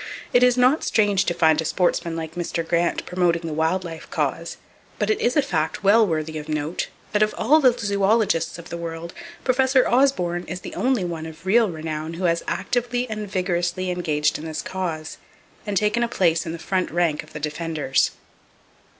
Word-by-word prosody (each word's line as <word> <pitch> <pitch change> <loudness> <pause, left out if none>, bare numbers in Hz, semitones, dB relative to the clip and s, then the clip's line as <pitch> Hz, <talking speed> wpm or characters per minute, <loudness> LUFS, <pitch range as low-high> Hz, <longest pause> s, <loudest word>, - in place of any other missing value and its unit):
It 245 - +5
is 250 0 +5
not 255 +5 +4
strange 205 -3 +2
to 175 - 0
find 160 -2 +4
a - - -3
sportsman 170 0 0
like 160 -1 -5
Mr. 170 -1 -3
Grant 170 0 0
promoting 175 -2 +1
the 160 -2 -4
wild 160 +4 0
life 165 -2 -8
cause, - - -2 0.4
but - - +1
it 425 - -1
is 245 +5 +1
a 295 - +4
fact 160 - -2
well 215 +2 +5
worthy 155 -2 -2
of 150 +1 -9
note 155 +2 -2 0.2
that 210 - +1
of 215 0 +2
all 305 +8 +4
the 250 -3 +4
zoologists 200 -5 +1
of 170 0 -11
the 170 - -5
world, 170 0 -6 0.3
Professor 260 0 +3
Osborn 180 -10 +2
is 180 +3 -6
the - - -8
only 255 -6 +1
one 165 -2 -4
of 160 +2 -12
real 220 +3 +4
renown 160 -1 -5
who 180 - -6
has 170 -1 +2
actively 245 0 -1
and 215 -2 -4
vigorously 180 0 -1
engaged 150 -4 0
in 155 - -8
this 160 -1 -4
cause, 165 -4 -4 0.5
and 205 -1 0
taken 210 +4 +1
a 235 - +2
place 170 -8 +1
in - - -3
the 170 - -5
front 185 +2 -1
rank 165 -3 0
of - - -17
the 150 - -5
Defenders. 155 -2 0
175 Hz, 195 wpm, -23 LUFS, 160-215 Hz, 0.5 s, It